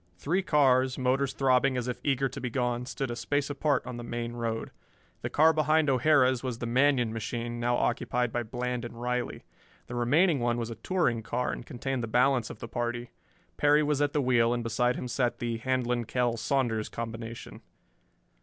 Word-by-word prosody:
Three 170 Hz, -, 0 dB
cars, 130 Hz, -6 st, +3 dB
motors 130 Hz, +1 st, +1 dB
throbbing 130 Hz, 0 st, +2 dB
as 125 Hz, -1 st, -2 dB
if 125 Hz, 0 st, -4 dB
eager 135 Hz, -1 st, +1 dB
to 130 Hz, -, -8 dB
be 125 Hz, -, -2 dB
gone, 125 Hz, 0 st, -1 dB
stood 135 Hz, -3 st, -3 dB
a -, -, -3 dB
space 145 Hz, +3 st, -1 dB
apart 145 Hz, 0 st, 0 dB
on 125 Hz, -1 st, -6 dB
the 120 Hz, -, -6 dB
main 120 Hz, 0 st, -4 dB
road. 115 Hz, -1 st, -3 dB, 0.5 s
The -, -, -3 dB
car 160 Hz, +2 st, +5 dB
behind 155 Hz, -1 st, +3 dB
O'Hara's 130 Hz, -1 st, +3 dB
was 125 Hz, -3 st, -3 dB
the 120 Hz, -, -4 dB
Manion 125 Hz, -1 st, +2 dB
machine, 120 Hz, +1 st, -4 dB
now 120 Hz, +1 st, +1 dB
occupied 120 Hz, 0 st, 0 dB
by 120 Hz, -, 0 dB
Bland 125 Hz, +1 st, -3 dB
and 120 Hz, -1 st, -8 dB
Riley. 125 Hz, 0 st, -2 dB, 0.4 s
The 120 Hz, -, -9 dB
remaining 145 Hz, +7 st, +3 dB
one 120 Hz, 0 st, 0 dB
was 115 Hz, -1 st, -3 dB
a -, -, -5 dB
touring 120 Hz, -4 st, 0 dB
car 125 Hz, +3 st, -2 dB
and -, -, -6 dB
contained 130 Hz, +1 st, -3 dB
the 115 Hz, -, -3 dB
balance 125 Hz, +1 st, +2 dB
of -, -, -8 dB
the 115 Hz, -, -7 dB
party. 120 Hz, +1 st, -3 dB, 0.5 s
Perry 145 Hz, +1 st, +4 dB
was 145 Hz, -1 st, 0 dB
at 145 Hz, 0 st, +2 dB
the 145 Hz, -1 st, 0 dB
wheel, 120 Hz, -2 st, +3 dB
and 120 Hz, -, -3 dB
beside 125 Hz, +2 st, +1 dB
him 125 Hz, -, -4 dB
sat 125 Hz, 0 st, 0 dB
the 120 Hz, -1 st, -2 dB
Handlon 125 Hz, -1 st, 0 dB
Kell 120 Hz, 0 st, 0 dB
Saunders 115 Hz, -3 st, 0 dB
combination. 115 Hz, 0 st, -7 dB
125 Hz, 195 wpm, -29 LUFS, 120-135 Hz, 0.5 s, car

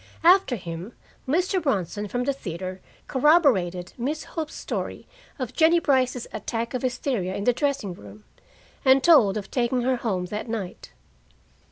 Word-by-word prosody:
After 360 Hz, -5 st, +5 dB
him, 175 Hz, +2 st, -7 dB, 0.3 s
Mr. 360 Hz, +6 st, +1 dB
Bronson 205 Hz, -, -1 dB
from 245 Hz, +4 st, -2 dB
the 280 Hz, +2 st, 0 dB
theater 185 Hz, -5 st, -6 dB, 0.3 s
corroborated 255 Hz, -, +3 dB
Miss 295 Hz, +6 st, -2 dB
Hope's 315 Hz, -2 st, -5 dB
story -, -, -4 dB, 0.3 s
of 255 Hz, -5 st, -4 dB
Jennie 330 Hz, +1 st, +5 dB
Brice's 260 Hz, -5 st, +1 dB
attack 230 Hz, +3 st, -3 dB
of 255 Hz, -, -2 dB
hysteria 245 Hz, -7 st, -1 dB
in 200 Hz, -, -3 dB
the 245 Hz, -, +3 dB
dressing 280 Hz, -8 st, -1 dB
room, 105 Hz, -, -13 dB, 0.6 s
and 265 Hz, 0 st, +5 dB
told 255 Hz, -, +6 dB
of 205 Hz, -, -6 dB
taking 245 Hz, 0 st, 0 dB
her 255 Hz, 0 st, +1 dB
home 195 Hz, -7 st, -2 dB
that 210 Hz, +2 st, -4 dB
night. 210 Hz, -6 st, -5 dB
245 Hz, 150 wpm, -25 LUFS, 195-280 Hz, 0.6 s, told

